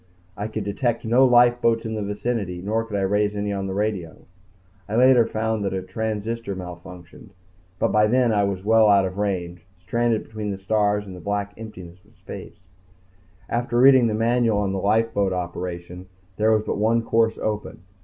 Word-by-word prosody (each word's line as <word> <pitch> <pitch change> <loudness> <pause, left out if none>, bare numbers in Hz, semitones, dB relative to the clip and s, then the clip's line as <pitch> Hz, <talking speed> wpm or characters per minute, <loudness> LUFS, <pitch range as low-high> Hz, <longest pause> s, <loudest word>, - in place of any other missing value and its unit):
I 105 - -4
could 110 -1 -4
detect 115 +4 -2
no 120 +4 +4
lifeboats 120 -2 +4
in 110 - -3
the 110 - -3
vicinity 100 -2 -3
nor 110 +5 -1
could 110 -3 -4
I - - -1
raise 105 +2 +1
any 105 0 -2
on 95 -1 -3
the 95 - -4
radio. 100 -6 -3 0.6
I 105 - -2
later 125 -1 +5
found 110 -1 -2
that 100 -1 -2
a 95 - -3
transistor 110 +2 -4
malfunctioned, 90 +1 -10 0.5
but - - 0
by 105 0 +4
then 120 0 +2
I 105 -1 +2
was 95 -1 -4
well 110 0 +5
out 100 -1 +5
of 95 +1 -5
range, 90 -4 -3 0.2
stranded 115 +4 0
between 110 -1 -6
the 100 - -3
stars 105 +1 0
in 95 - -9
the 90 - -9
black 100 +1 -3
emptiness 95 -5 -11
of 105 +3 -26
space. - - -10 0.9
After 120 0 -1
reading 130 -1 +6
the 110 - -1
manual 115 -1 +2
on 100 -2 -1
lifeboat 100 0 +1
operation 90 0 -5 0.3
there 110 +1 +3
was 110 -1 +2
but 100 - -3
one 115 +2 +2
course 115 0 +1
open. 105 -4 -4
105 Hz, 185 wpm, -23 LUFS, 95-115 Hz, 0.9 s, reading